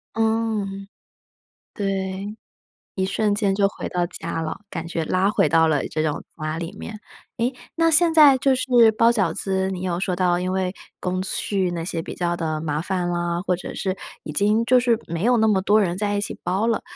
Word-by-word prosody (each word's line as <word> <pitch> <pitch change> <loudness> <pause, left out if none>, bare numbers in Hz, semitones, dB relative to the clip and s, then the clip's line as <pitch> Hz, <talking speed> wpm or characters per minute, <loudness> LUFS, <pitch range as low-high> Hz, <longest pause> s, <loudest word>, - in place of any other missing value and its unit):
嗯。 220 -3 -1 0.9
对， 195 0 -3 0.6
一 190 - 0
瞬 205 +1 0
间 200 -2 +1
就 200 0 +3
回 - - -6
到 175 -1 -1
家 165 -1 -5
了， 160 - -5
感 165 -1 -5
觉 165 -1 -3
拉 185 +4 +1
回 205 - +2
到 160 +2 +4
了 150 -3 0
这 155 - -2
种 155 -2 -2
家 155 0 -4
里 165 0 -5
面。 215 -1 -8 0.4
哎， 240 +3 0 0.2
那 330 0 +3
现 335 +2 +5
在 295 -5 +7
就 270 0 +3
是 245 -3 +4
包 230 +1 +5
饺 235 -4 +1
子， 190 -1 -1
你 185 -2 -5
有 175 -1 -2
说 185 -1 -1
到， 175 -1 +1
因 185 +1 -2
为 185 -1 -1 0.3
工 185 0 -2
序 190 -1 +1
那 170 -1 -4
些 165 -3 -2
比 - - -8
较 175 -1 -1
地 160 -2 -2
麻 155 -1 -2
烦 180 -1 -2
啦， 175 0 -1
或 185 -2 +1
者 175 - -8
是 190 -1 -2 0.3
已 150 - -6
经 210 +7 +2
就 250 +2 +5
是 240 -2 +2
没 170 +2 -4
有 245 0 +4
那 220 -1 +3
么 200 -3 +2
多 210 +3 +4
人 180 -4 0
在 205 +1 -1
一 205 - 0
起 - - -3
包 195 +4 0
了。 230 -1 +1
190 Hz, 225 characters per minute, -22 LUFS, 175-220 Hz, 0.9 s, 在